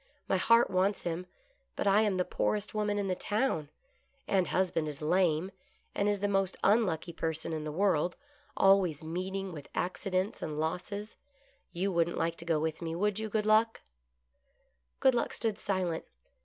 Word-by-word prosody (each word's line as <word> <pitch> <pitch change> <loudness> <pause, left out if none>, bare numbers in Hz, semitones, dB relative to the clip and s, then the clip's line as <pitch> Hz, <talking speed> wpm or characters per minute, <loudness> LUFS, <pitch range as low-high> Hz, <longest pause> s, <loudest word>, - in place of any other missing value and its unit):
My 190 - +2
heart 230 +3 +4
wants 190 +2 +1
him, 175 +1 -3 0.5
but - - -2
I 200 +1 +5
am 205 -4 +1
the 180 - +1
poorest 210 -1 -1
woman 210 -1 0
in 200 -1 -1
the 185 - +1
town, 195 - -1 0.6
and 190 -2 +2
husband 180 -4 0
is 150 -1 -5
lame, 175 +2 +2 0.4
and 205 +1 +1
is 205 -1 0
the 205 - +2
most 195 -2 0
unlucky 185 -6 +2
person 160 0 -2
in 155 -1 -3
the 155 - -3
world, 175 -1 +1 0.4
always 185 -6 +4
meeting 185 +4 -3
with 150 -4 -9
accidents 185 +3 -1
and 150 -1 -4
losses. 195 +6 -3 0.5
You 190 +3 -1
wouldn't 170 -1 +1
like 165 0 0
to 170 - -7
go 165 -2 +2
with 160 +1 -2
me, 165 -1 -3
would 205 +3 0
you. 220 0 -3
Good 210 0 0
Luck 220 +1 +3 0.4
} 60 0 -45
" 60 0 -45
Good 265 - +5
Luck 240 - 0
stood 220 -3 -2
silent. 185 -4 -1
185 Hz, 180 wpm, -31 LUFS, 165-205 Hz, 0.6 s, I